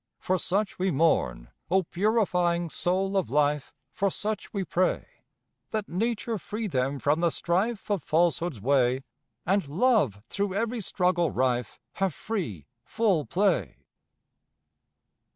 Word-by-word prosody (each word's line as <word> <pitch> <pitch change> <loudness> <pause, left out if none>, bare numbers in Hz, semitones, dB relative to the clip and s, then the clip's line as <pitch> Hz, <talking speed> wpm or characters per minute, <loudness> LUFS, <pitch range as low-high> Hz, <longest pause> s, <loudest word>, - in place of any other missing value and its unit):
For 185 0 0
such 200 +3 -1
we 190 +1 +2
mourn, 65 - +1 0.2
O 190 +2 +3
purifying 180 -3 +1
soul 190 +2 0
of 190 -9 +1
life, 145 -1 +1 0.2
For 200 -2 0
such 210 +2 -4
we 200 -2 -2
pray. 185 0 0 0.7
Let 215 -2 -2
Nature 225 +3 -1
free 215 +5 -4
them 135 -6 0
from 145 +4 +1
the 170 0 +3
strife 195 +7 -1
Of 200 -4 +1
falsehood's 165 -3 +1
way, 130 +2 +2 0.4
And 195 -4 +1
Love 155 - +2
through 200 +4 -2
every 230 +2 -1
struggle 180 -3 +1
rife 125 -2 -1 0.2
Have 195 -5 0
free, 120 - -4 0.2
full 200 -10 +1
play. 200 +2 0
180 Hz, 130 wpm, -27 LUFS, 145-200 Hz, 0.7 s, O